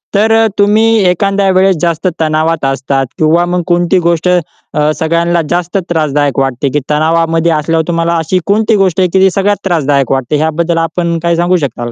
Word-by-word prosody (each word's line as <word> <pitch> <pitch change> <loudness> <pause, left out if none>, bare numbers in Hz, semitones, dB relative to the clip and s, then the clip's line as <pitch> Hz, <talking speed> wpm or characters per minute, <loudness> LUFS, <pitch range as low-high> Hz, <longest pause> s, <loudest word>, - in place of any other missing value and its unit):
तर 220 +2 +2
अ, 225 0 +3
तुम्ही 210 +2 +3 0.2
एखाद्या 195 +2 0
वेळेस 190 0 +3
जास्त 170 +1 -1
तणावात 155 -1 0
असतात, 135 0 -1
किंवा 165 +3 +2
मग 180 0 -1
कोणती 175 +1 +1
गोष्ट 170 +1 0
अ, 155 -3 -2
सगळ्यांना 170 +1 0
जास्त 175 +2 -1
त्रासदायक 145 -4 0
वाटते, 135 0 -1
की 150 - +1
तणावामध्ये 165 +2 +1
असल्यावर 160 +1 -1
तुम्हाला 170 0 0
अशी 165 +3 -1
कोणती 215 +2 +1
गोष्ट 190 -3 +1
आहे, 185 -1 +2
की 190 - +3
ती 190 - +5
सगळ्यात 205 +1 +1
त्रासदायक 145 -7 0
वाटते? 135 +2 -1
ह्याबद्दल 165 +2 -1
आपण 170 +1 -1
काय 170 0 +1
सांगू 175 +2 +1
शकाल 120 -3 -6
170 Hz, 175 wpm, -11 LUFS, 155-180 Hz, 0.2 s, ती